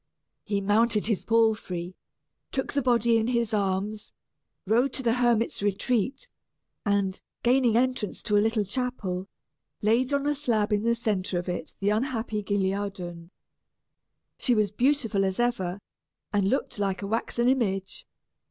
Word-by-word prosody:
He 200 -2 -1
mounted 210 +2 +2
his 215 -3 0
palfrey, 215 -6 +1 0.6
took 265 - -2
the 280 - +1
body 235 -2 +3
in 225 0 0
his 235 -2 0
arms, 205 +1 -1 0.5
rode 240 +6 +2
to 265 - -4
the 230 -2 +3
hermit's 240 -3 +1
retreat, 225 - 0 0.6
and, 200 -2 0 0.2
gaining 245 -2 +4
entrance 250 -4 0
to 210 - 0
a 205 - +5
little 220 -1 +1
chapel, 195 -5 -3 0.6
laid 235 +5 +2
on 280 0 +1
a 295 - +2
slab 225 -7 0
in 205 - +2
the 235 +1 +2
centre 200 -5 -1
of 175 - -3
it 175 -2 -4
the 200 - +1
unhappy 225 -2 -1
Guilliadun. 195 -4 -2 1.1
She 245 - +2
was 210 -3 +2
beautiful 240 -4 +1
as 190 +1 -1
ever, 200 -6 0 0.5
and 200 -1 +2
looked 245 -3 -1
like 200 0 -1
a - - -3
waxen 235 +2 0
image. 195 -7 0
215 Hz, 145 wpm, -27 LUFS, 195-240 Hz, 1.1 s, a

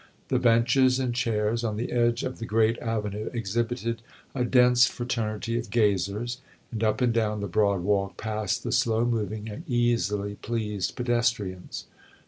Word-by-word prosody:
The 130 - +2
benches 125 +2 +4
and 130 -2 -1
chairs 115 -1 0
on 110 -2 -2
the 120 - -3
edge 120 0 +1
of 130 - -4
the 115 - -4
great 115 +1 +2
avenue 105 -2 -3
exhibited 115 +1 -2 0.3
a 125 - 0
dense 125 0 +5
fraternity 115 -1 -2
of 115 -2 -6
gazers, 105 +2 0 0.3
and 115 -1 -3
up 110 -1 +1
and 120 -2 +3
down 105 -2 0
the 100 - -3
broad 100 0 +2
walk 100 +1 0
passed 110 -2 -2
the - - -3
slow 115 0 +2
moving 110 -2 -2
and 105 +8 -7
easily 105 -4 0
pleased 105 -4 -2
pedestrians. 115 -7 -1
115 Hz, 155 wpm, -26 LUFS, 105-120 Hz, 0.3 s, dense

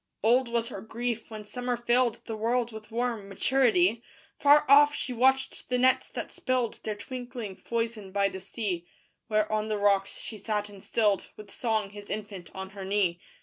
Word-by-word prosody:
Old 245 +3 +4
was 235 0 -1
her 195 - -6
grief 235 +2 -3
when 215 -1 -8
summer 245 +2 -2
filled 240 0 +1
The 225 - -4
world 235 +2 0
with 215 -1 -10
warm 230 -3 -2
maturity: 225 -1 +3 0.4
Far 290 +1 +6
off 290 +1 +7
she 255 - -3
watched 265 +2 +1
the 250 - +2
nets 255 +1 +3
that - - -5
spilled 255 -3 -1
Their 215 - -2
twinkling 245 -2 -6
foison 230 -4 -3
by 200 0 +2
the 190 -1 -6
sea: 185 -4 -3 0.4
Where 215 -1 +1
on 215 0 0
the 215 -1 -1
rocks 200 -1 +2
she 215 - -7
sat 210 0 -2
and 200 -2 -12
stilled 210 -3 +1
With 210 -2 -11
song 220 -4 -1
his 205 0 -11
infant 205 -4 -5
on 190 0 -6
her 195 -1 -8
knee. 190 -3 +1
220 Hz, 185 wpm, -28 LUFS, 205-245 Hz, 0.4 s, off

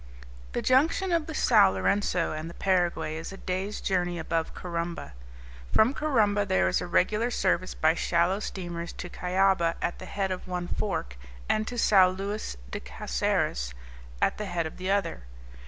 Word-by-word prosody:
The - - -2
junction 320 +8 +3
of 330 -3 +1
the 315 - -5
Sao 95 - +6
Lourenco 170 - +1
and 155 +2 -5
the 170 - -11
Paraguay 175 -4 0
is 160 - -6
a 195 - -8
day's 190 +3 -3
journey 175 -2 0
above 165 0 -2
Corumba. 170 - -4 0.6
From 225 +5 +4
Corumba 220 -9 +2
there 95 - +2
is 90 - +1
a - - -4
regular 210 +7 +2
service 185 -5 0
by 155 +1 +3
shallow 170 +3 +1
steamers 175 -4 -5
to 175 - -7
Cuyaba, 180 -2 +2
at 175 - -2
the 185 - -8
head 195 -1 -2
of 185 - -5
one 180 -1 -3
fork, 65 - -3 0.3
and 215 0 +1
to 245 - -5
Sao 190 -5 +6
Luis 195 - -4
de - - -3
Caceres, - - -1 0.5
at - - +1
the 210 - -2
head 170 -3 -1
of 160 - -7
the 185 +1 -4
other. 200 - 0
185 Hz, 170 wpm, -28 LUFS, 170-205 Hz, 0.6 s, Sao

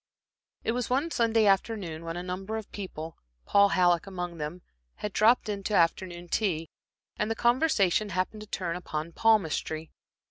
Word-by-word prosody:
It - - +1
was 245 0 -2
one 280 +6 +1
Sunday 225 -4 +3
afternoon 195 -5 +1
when 165 +1 -4
a 175 - -4
number 190 +4 -4
of 220 - -8
people, 165 -5 -7 0.3
Paul 200 0 +5
Halleck 175 -1 +3
among 175 -3 -5
them, 155 +4 -5 0.3
had 210 -1 -5
dropped 230 +2 +4
in 205 -2 -3
to 210 - 0
afternoon 175 0 +1
tea, 165 -5 -1 0.5
and 210 - 0
the 225 - 0
conversation 235 - +2
happened 185 +4 -2
to 215 - -9
turn 175 -4 -3
upon 165 -2 -4
palmistry. 165 -6 +1
190 Hz, 165 wpm, -28 LUFS, 170-220 Hz, 0.5 s, Paul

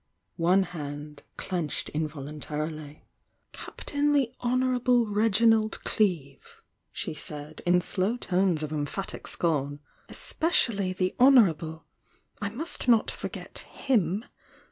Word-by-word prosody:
One 180 +4 +4
hand 150 -3 -7 0.2
clenched 175 -5 -2
involuntarily. 150 0 -5 0.5
"Captain 290 0 -2
the 265 -4 +2
Honourable 250 -1 +2
Reginald 220 +1 +3
Cleevel" 165 -10 0 0.5
she - - -4
said, 150 0 -8
in 180 0 +5
slow 195 +6 -1
tones 180 -7 +1
of 155 - -4
emphatin 150 +6 -4
scorn— 145 -4 0 0.3
"Especially 225 - +1
the 185 0 -1
Honourable! 170 - +4 0.6
I 205 - -1
must 270 +6 -4
not 230 -3 +4
forget - - -6
him! 210 - 0
185 Hz, 100 wpm, -27 LUFS, 155-230 Hz, 0.6 s, in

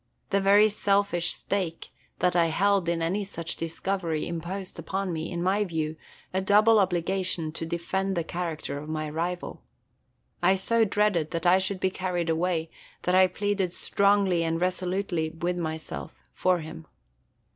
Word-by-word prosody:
The 200 0 +3
very 200 +2 +6
selfish 200 -4 +1
stake 185 -5 -3 0.3
that 180 0 +1
I 170 -1 +4
held 195 +1 +2
in 165 -1 0
any 190 +5 0
such 170 -4 -5
discovery 165 0 -2
imposed 175 +3 -5
upon 190 -2 -2
me, 160 +2 -4
in 175 -1 -2
my 195 +3 +2
view, 160 -4 -2 0.4
a 190 - +1
double 210 +3 +5
obligation 185 -2 0
to 165 0 -5
defend 190 +3 -2
the 170 - +1
character 160 -4 -4
of 150 +1 -9
my 155 -1 -2
rival. 175 +3 -3 0.8
I 185 +2 +5
so 225 +4 +2
dreaded 200 -6 +1
that 170 0 -3
I 180 +2 +6
should 190 0 -2
be 190 0 +1
carried 180 -3 -1
away 165 -1 0 0.3
that 180 - +1
I 185 0 +6
pleaded 195 -1 -1
strongly 200 -4 +2
and 165 0 0
resolutely 180 -2 -1
with 175 +2 -3
myself 160 -1 -5 0.2
for 180 -2 +1
him. 160 0 -9
180 Hz, 155 wpm, -27 LUFS, 165-195 Hz, 0.8 s, very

